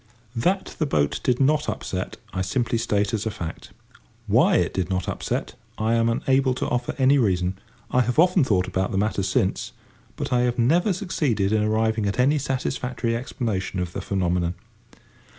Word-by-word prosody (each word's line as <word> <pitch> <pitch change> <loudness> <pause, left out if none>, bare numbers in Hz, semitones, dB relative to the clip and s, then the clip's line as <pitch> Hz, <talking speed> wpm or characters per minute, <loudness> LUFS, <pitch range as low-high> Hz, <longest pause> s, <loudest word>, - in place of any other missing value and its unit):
That 185 +12 0
the 155 - +1
boat 75 - +1
did 125 -1 +1
not 150 +3 +2
upset 95 +4 -4 0.2
I 95 - -1
simply 115 +4 0
state 105 -3 0
as 110 0 -1
a - - +1
fact. 85 -6 -7 0.6
Why - - +4
it - - +1
did 95 -1 -2
not 95 -1 -1
upset - - -3 0.2
I 110 +1 +1
am 115 0 +3
unable 130 +2 +2
to - - -2
offer 125 0 -2
any 135 +1 +4
reason. 95 -4 0 0.3
I 125 - +4
have 125 0 -1
often 180 0 +5
thought 95 -7 +1
about 95 0 -1
the 95 - -1
matter 105 0 0
since, 95 0 0 0.4
but - - -3
I 125 - +3
have 125 0 +1
never 165 - +3
succeeded 145 - 0
in 110 - +3
arriving 110 0 +1
at 100 - -2
any 140 +4 +3
satisfactory 125 -3 -2
explanation 110 -6 -3
of 90 -1 -3
the - - -4
phenomenon. 90 -2 0
115 Hz, 180 wpm, -24 LUFS, 95-130 Hz, 0.6 s, often